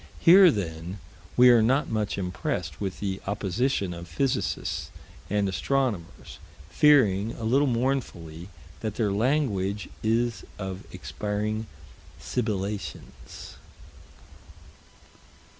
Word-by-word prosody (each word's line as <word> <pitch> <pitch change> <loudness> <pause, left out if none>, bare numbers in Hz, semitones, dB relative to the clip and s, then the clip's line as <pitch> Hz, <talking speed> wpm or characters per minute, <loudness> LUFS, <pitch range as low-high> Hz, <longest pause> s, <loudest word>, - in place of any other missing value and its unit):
Here 185 +2 +8
then 90 - -3 0.4
we 125 0 +8
are 120 -2 +6
not 130 +6 +2
much 105 -2 -2
impressed 90 -3 -3
with 95 -2 -3
the 95 -1 -3
opposition 100 0 -1
of 85 0 -8
physicists 90 - -1 0.4
and 105 0 +1
astronomers, 100 -1 -2 0.3
fearing, 115 -8 +4
a - - -8
little 135 +6 +3
mournfully, 115 -10 -2 0.3
that 110 -2 -4
their 105 -4 0
language 105 -4 0
is 115 +1 0
of 95 -2 -6
expiring 105 +1 -3 0.5
sibilations. 105 -4 -5
105 Hz, 95 wpm, -26 LUFS, 95-125 Hz, 0.5 s, Here